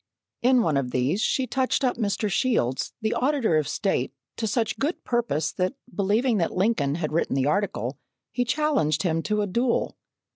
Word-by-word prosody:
In 250 Hz, 0 st, +4 dB
one 155 Hz, -4 st, +1 dB
of 135 Hz, -2 st, -1 dB
these 130 Hz, +12 st, 0 dB
she 260 Hz, -, +1 dB
touched 260 Hz, +3 st, 0 dB
up 255 Hz, -, +2 dB
Mr. 210 Hz, -1 st, -1 dB
Shields, 195 Hz, -, 0 dB
the 220 Hz, +1 st, 0 dB
Auditor 255 Hz, -, +2 dB
of 150 Hz, -2 st, 0 dB
State, 155 Hz, -5 st, -1 dB, 0.3 s
to 225 Hz, -, -1 dB
such 225 Hz, +1 st, -1 dB
good 300 Hz, +6 st, -1 dB
purpose 230 Hz, -, 0 dB
that 185 Hz, +8 st, -1 dB, 0.2 s
believing 215 Hz, +4 st, +2 dB
that 170 Hz, -, -1 dB
Lincoln 180 Hz, -9 st, +1 dB
had 155 Hz, -3 st, -2 dB
written 160 Hz, -4 st, 0 dB
the 135 Hz, -1 st, +1 dB
article, 145 Hz, -, -1 dB, 0.3 s
he 245 Hz, -, 0 dB
challenged 275 Hz, -, +1 dB
him 165 Hz, -3 st, +1 dB
to 210 Hz, +3 st, 0 dB
a -, -, 0 dB
duel. 235 Hz, +5 st, 0 dB
205 Hz, 180 wpm, -25 LUFS, 155-245 Hz, 0.3 s, In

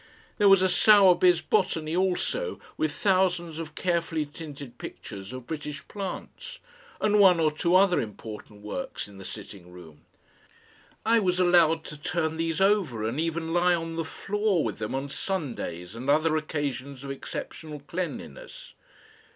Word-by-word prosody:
There 205 Hz, -1 st, +6 dB
was 195 Hz, -1 st, +6 dB
a -, -, +5 dB
Sowerby's 185 Hz, -4 st, +6 dB
BOTANY 165 Hz, -4 st, 0 dB
also, 190 Hz, -, -1 dB, 0.2 s
with 155 Hz, -1 st, 0 dB
thousands 180 Hz, -3 st, +1 dB
of 155 Hz, -2 st, -7 dB
carefully 170 Hz, -3 st, 0 dB
tinted 145 Hz, -4 st, -10 dB
pictures 100 Hz, 0 st, -8 dB
of 130 Hz, -1 st, -8 dB
British 150 Hz, -1 st, -6 dB
plants, 205 Hz, -, -7 dB, 0.4 s
and 210 Hz, 0 st, +3 dB
one 185 Hz, -4 st, +7 dB
or 155 Hz, -2 st, +3 dB
two 170 Hz, +4 st, +1 dB
other 185 Hz, -1 st, +5 dB
important 105 Hz, -1 st, -9 dB
works 105 Hz, -2 st, -5 dB
in 100 Hz, -1 st, -13 dB
the -, -, -9 dB
sitting 100 Hz, -4 st, -9 dB
room. 80 Hz, -4 st, -13 dB, 1.0 s
I 230 Hz, +1 st, +5 dB
was 185 Hz, -3 st, +1 dB
allowed 170 Hz, -3 st, +4 dB
to 150 Hz, -1 st, -10 dB
turn 160 Hz, -1 st, -1 dB
these 165 Hz, +1 st, -1 dB
over 190 Hz, -, +2 dB
and 115 Hz, +6 st, -2 dB
even 165 Hz, 0 st, -2 dB
lie 175 Hz, 0 st, +4 dB
on 165 Hz, -1 st, -4 dB
the 165 Hz, -, -1 dB
floor 200 Hz, +2 st, 0 dB
with 110 Hz, -4 st, -3 dB
them 105 Hz, +5 st, -3 dB
on 135 Hz, +1 st, -2 dB
Sundays 125 Hz, -, -4 dB
and 125 Hz, +4 st, -5 dB
other 155 Hz, +2 st, +3 dB
occasions 140 Hz, -4 st, -3 dB
of 140 Hz, -, -5 dB
exceptional 150 Hz, +2 st, -7 dB
cleanliness. 345 Hz, -, -6 dB
160 Hz, 150 wpm, -27 LUFS, 140-185 Hz, 1.0 s, one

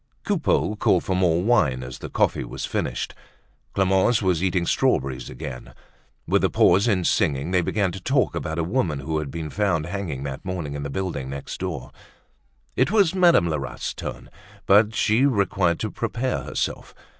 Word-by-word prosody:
Coupeau 165 Hz, -, +1 dB
called 95 Hz, -3 st, +2 dB
for 95 Hz, -, -1 dB
more 90 Hz, -2 st, +2 dB
wine 75 Hz, -, +2 dB
as 65 Hz, +1 st, -8 dB
the -, -, -7 dB
coffee -, -, +1 dB
was -, -, -5 dB
finished. -, -, -3 dB, 0.6 s
Clemence 95 Hz, +4 st, +3 dB
was 90 Hz, -4 st, +1 dB
eating 90 Hz, -2 st, +1 dB
strawberries 65 Hz, -5 st, 0 dB
again. 60 Hz, -2 st, -8 dB, 0.5 s
With -, -, +2 dB
the -, -, +2 dB
pause 95 Hz, +6 st, +4 dB
in 95 Hz, -6 st, +2 dB
singing, 70 Hz, 0 st, +1 dB
they 90 Hz, -1 st, +3 dB
began 95 Hz, +2 st, 0 dB
to 95 Hz, +2 st, -8 dB
talk 130 Hz, +4 st, +1 dB
about 80 Hz, -1 st, -3 dB
a 85 Hz, -, +1 dB
woman 85 Hz, -, -1 dB
who 80 Hz, +2 st, -2 dB
had 75 Hz, -2 st, -4 dB
been 80 Hz, 0 st, -5 dB
found 95 Hz, -6 st, 0 dB
hanging 85 Hz, -7 st, -4 dB
that 70 Hz, -2 st, -5 dB
morning 85 Hz, -6 st, -4 dB
in 70 Hz, -, -4 dB
the 70 Hz, -, -4 dB
building 70 Hz, -5 st, -3 dB
next 70 Hz, 0 st, -6 dB
door. 80 Hz, -9 st, -5 dB, 0.8 s
It 130 Hz, +3 st, +2 dB
was 200 Hz, -5 st, +3 dB
Madame 175 Hz, -, +5 dB
Lerat's 70 Hz, -6 st, -3 dB
turn, -, -, -7 dB, 0.3 s
but 105 Hz, +2 st, +4 dB
she 115 Hz, +7 st, +3 dB
required 100 Hz, -7 st, +1 dB
to 110 Hz, -, -2 dB
prepare 120 Hz, +2 st, -2 dB
herself. -, -, -3 dB
90 Hz, 175 wpm, -24 LUFS, 75-105 Hz, 0.8 s, Madame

